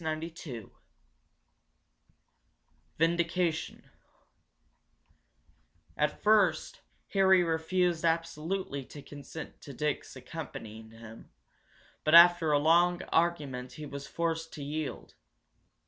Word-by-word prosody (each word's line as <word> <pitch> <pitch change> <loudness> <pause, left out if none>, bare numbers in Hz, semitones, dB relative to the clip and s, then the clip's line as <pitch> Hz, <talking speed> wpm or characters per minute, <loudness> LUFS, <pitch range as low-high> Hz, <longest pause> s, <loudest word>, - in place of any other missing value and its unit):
CHAPTER 155 0 -2
XVIII 135 - -9 2.3
VINDICATION 170 0 0 2.0
At - - -1
first 205 -6 +2 0.3
Harry 190 -2 +4
refused 170 +1 0
absolutely 165 -2 -1
to 145 +1 -11
consent 145 +2 -10
to 140 - -10
Dick's 150 +1 -3
accompanying 115 -6 -8
him, 115 0 -13 0.7
but 155 +2 +4
after 170 -2 +8
a 145 - +5
long 175 +4 +3
argument 140 -7 0
he 150 - -8
was 140 -1 -7
forced 165 -1 -2
to 145 - -7
yield. 150 +1 -5
160 Hz, 90 wpm, -30 LUFS, 145-170 Hz, 2.3 s, after